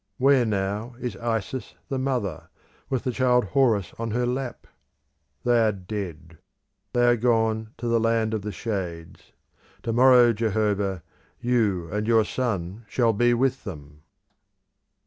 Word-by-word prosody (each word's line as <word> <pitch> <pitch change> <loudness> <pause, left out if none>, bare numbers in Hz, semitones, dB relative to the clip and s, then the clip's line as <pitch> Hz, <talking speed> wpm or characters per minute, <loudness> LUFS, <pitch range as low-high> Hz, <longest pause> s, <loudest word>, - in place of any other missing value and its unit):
Where 135 -1 +4
now 105 +4 -2
is 125 -2 -4
Isis 115 +1 -3
the 135 - -2
mother, 130 -7 -2 0.4
with 130 -3 -1
the 130 - -1
child 125 -2 +2
Horus 115 -9 +2
on 115 0 -2
her 120 +3 0
lap? 125 0 -3 0.8
They 120 -1 +3
are 110 -1 +3
dead; 90 -5 -7 0.5
they 120 0 +3
are 120 0 +5
gone 110 -2 0
to 120 - -4
the 115 0 +3
land 115 -1 +1
of 110 - -1
the 105 +1 -4
shades. 90 -6 -5 0.5
To 115 - -1
morrow, 125 -1 +6
Jehovah, 105 -4 0 0.4
you 110 -8 +1
and 105 +1 -2
your 115 -2 +4
son 105 -4 -3
shall 115 -3 +2
be 120 +3 +3
with 130 +2 0
them! 75 -6 -9
115 Hz, 145 wpm, -25 LUFS, 100-120 Hz, 0.8 s, morrow